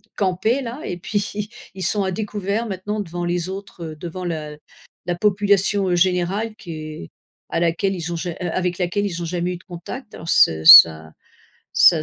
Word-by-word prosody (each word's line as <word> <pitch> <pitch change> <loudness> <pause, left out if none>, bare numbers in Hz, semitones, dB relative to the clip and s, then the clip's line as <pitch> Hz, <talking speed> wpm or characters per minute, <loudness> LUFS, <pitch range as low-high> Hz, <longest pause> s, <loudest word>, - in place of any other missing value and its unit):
campaient 200 +7 0
là 245 +5 -6
et 175 - -4
puis 205 +2 -3 0.3
ils 190 - -5
sont 200 +3 0
à 190 - -1
découvert 205 +2 -3
maintenant 205 +2 -4
devant 175 -2 -5
les 175 +1 -2
autres, 190 -5 -8
devant 180 +2 -6
la 155 -3 -5 0.5
la 175 - 0
population, 200 0 +2
heu, 175 - +2
générale 185 +5 0
qui 175 -5 -10
est 155 - -8 0.4
à 165 - 0
laquelle 170 +3 0
ils 170 -1 -5
ont - - -3
ja 175 +1 -4
a 180 - -3
avec 180 +1 -2
laquelle 180 +3 -1
ils 175 -3 -5
ont - - -3
jamais 175 +1 -2
eu - - -6
de 180 - -20
contact 200 +7 -9
alors 165 - -8
ce 80 - +4
ça 80 -1 +9 0.6
ça 160 -3 +5
180 Hz, 190 wpm, -21 LUFS, 170-205 Hz, 0.6 s, ça